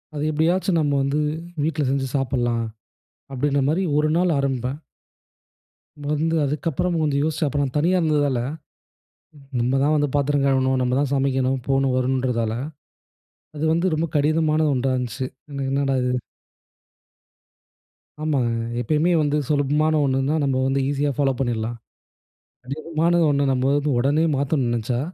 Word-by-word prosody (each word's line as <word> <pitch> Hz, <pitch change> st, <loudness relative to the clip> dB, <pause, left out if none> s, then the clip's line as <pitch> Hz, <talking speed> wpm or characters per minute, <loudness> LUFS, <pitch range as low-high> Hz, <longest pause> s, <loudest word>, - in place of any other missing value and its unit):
"அது 145 Hz, -, -2 dB
எப்படியாச்சும் 170 Hz, +4 st, +1 dB
நம்ம 145 Hz, -2 st, +1 dB
வந்து 140 Hz, +2 st, 0 dB, 0.4 s
வீட்ல 155 Hz, -1 st, 0 dB
செஞ்சு 135 Hz, 0 st, 0 dB
சாப்டலாம்." 120 Hz, -3 st, 0 dB, 0.7 s
அப்படின்னா 140 Hz, +1 st, +1 dB
மாரி 170 Hz, +5 st, +1 dB
1 150 Hz, +1 st, +3 dB
நாள் 175 Hz, -2 st, +2 dB
ஆரம்பிப்பேன். 135 Hz, -1 st, -1 dB, 1.3 s
வந்து 160 Hz, +2 st, 0 dB
அதுக்கப்புறம் 165 Hz, +4 st, -1 dB
கொஞ்சம் 145 Hz, -2 st, +1 dB
யோசிச்சேன். 155 Hz, 0 st, 0 dB
அப்ப 145 Hz, -, -2 dB
நான் 135 Hz, -3 st, -2 dB
தனியா 175 Hz, +5 st, +2 dB
இருந்ததால, 145 Hz, -5 st, +1 dB, 1.2 s
நம்ம 120 Hz, +2 st, +1 dB
தான் 150 Hz, +2 st, +3 dB
வந்து 145 Hz, -1 st, +1 dB
பாத்திரம் 145 Hz, 0 st, +1 dB
கழுவணும், 130 Hz, -1 st, +2 dB
நம்ம 125 Hz, 0 st, 0 dB
தான் 145 Hz, -2 st, 0 dB
சமைக்கணும், 135 Hz, -1 st, +1 dB
போணும், 135 Hz, -1 st, +2 dB
வரணும்ன்றதால, 125 Hz, -3 st, 0 dB, 1.0 s
அது 150 Hz, -, -4 dB
வந்து 170 Hz, +3 st, 0 dB
ரொம்ப 160 Hz, +2 st, 0 dB
கடினமான 155 Hz, +1 st, +2 dB
ஒன்றா 130 Hz, 0 st, 0 dB
இருந்துச்சு. 125 Hz, +1 st, -3 dB, 0.3 s
"என் 140 Hz, -1 st, -3 dB
என்னடா 135 Hz, 0 st, 0 dB
இது?" 125 Hz, -, 0 dB, 2.1 s
ஆமாங்க. 140 Hz, -6 st, +1 dB, 0.3 s
எப்பயுமே 155 Hz, +8 st, +1 dB
வந்து 150 Hz, 0 st, +1 dB
சுலபமான 150 Hz, +2 st, +2 dB
ஒண்ணுன்னா, 135 Hz, +2 st, +1 dB
நம்ம 135 Hz, -2 st, +1 dB
வந்து 135 Hz, +1 st, +1 dB
ஈசியா 145 Hz, 0 st, 0 dB
ஃபாலோ 140 Hz, -2 st, +2 dB
பண்ணிடலாம். 120 Hz, -2 st, -2 dB, 0.9 s
கடினமானது 160 Hz, +5 st, 0 dB
ஒண்ண 140 Hz, 0 st, +1 dB
நம்ம 130 Hz, 0 st, 0 dB
வந்து 145 Hz, +1 st, +1 dB
உடனே 145 Hz, +6 st, +2 dB
மாத்தணும்னு 135 Hz, -3 st, 0 dB
நினச்சா, 120 Hz, +1 st, -1 dB
140 Hz, 135 wpm, -22 LUFS, 130-155 Hz, 2.1 s, 1